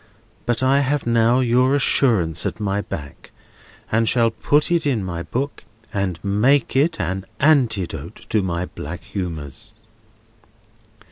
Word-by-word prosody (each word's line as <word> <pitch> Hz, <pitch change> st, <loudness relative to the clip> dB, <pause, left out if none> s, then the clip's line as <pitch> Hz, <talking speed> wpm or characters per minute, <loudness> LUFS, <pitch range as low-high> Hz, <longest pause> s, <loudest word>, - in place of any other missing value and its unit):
But 120 Hz, +1 st, 0 dB
I 135 Hz, +2 st, +4 dB
have 140 Hz, +1 st, 0 dB
now 115 Hz, +2 st, +3 dB
your 125 Hz, +2 st, +3 dB
assurance 100 Hz, -, +2 dB
at -, -, -5 dB
my 100 Hz, -1 st, -1 dB
back, 75 Hz, -7 st, -8 dB, 0.6 s
and 110 Hz, 0 st, +2 dB
shall 115 Hz, -2 st, +3 dB
put 145 Hz, +7 st, +1 dB
it 170 Hz, -3 st, +2 dB
in 120 Hz, -8 st, 0 dB
my 85 Hz, -2 st, -4 dB
book, 135 Hz, +10 st, -4 dB, 0.3 s
and 100 Hz, -4 st, -1 dB
make 115 Hz, +8 st, +2 dB
it 145 Hz, +6 st, +2 dB
an 95 Hz, +2 st, -2 dB, 0.2 s
antidote 110 Hz, -, +1 dB, 0.2 s
to 110 Hz, -, +3 dB
my 90 Hz, -1 st, -2 dB
black 85 Hz, 0 st, -8 dB
humours." 90 Hz, +2 st, -6 dB
110 Hz, 135 wpm, -21 LUFS, 90-130 Hz, 0.6 s, I